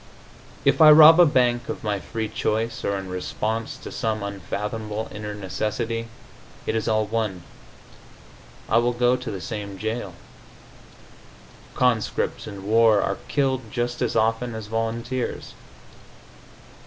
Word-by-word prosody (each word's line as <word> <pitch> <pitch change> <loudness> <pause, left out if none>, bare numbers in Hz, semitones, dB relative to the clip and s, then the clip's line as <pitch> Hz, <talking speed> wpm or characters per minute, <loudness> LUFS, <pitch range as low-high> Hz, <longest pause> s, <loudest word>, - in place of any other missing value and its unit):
If - - +3
I 155 - +10
rob 155 +2 +9
a 175 - +8
bank 120 -3 +1
of - - -5
my 105 -2 -1
free 110 +2 -4
choice 115 +2 -2
or 100 - 0
in 95 -1 -6
response 110 +5 -3
to - - -9
some 110 -2 -2
unfathomable 105 +2 -4
inner 105 0 -6
necessity, 110 +4 -3 0.6
it - - -1
is 110 -1 -1
all 110 -1 +2
one; 105 -5 -2 1.2
I 115 - +4
will 120 +1 +1
go 120 +1 +3
to 125 -1 -6
the 100 - -5
same 100 -1 -6
jail. 110 -3 -4 1.6
Conscripts 125 -4 0
in 100 -2 -8
war 110 0 +5
are 100 - -2
killed 130 -5 0
just 120 0 -2
as 125 - 0
often 115 +1 +1
as 110 -1 -6
volunteers. 115 +3 -3
110 Hz, 135 wpm, -24 LUFS, 105-120 Hz, 1.6 s, I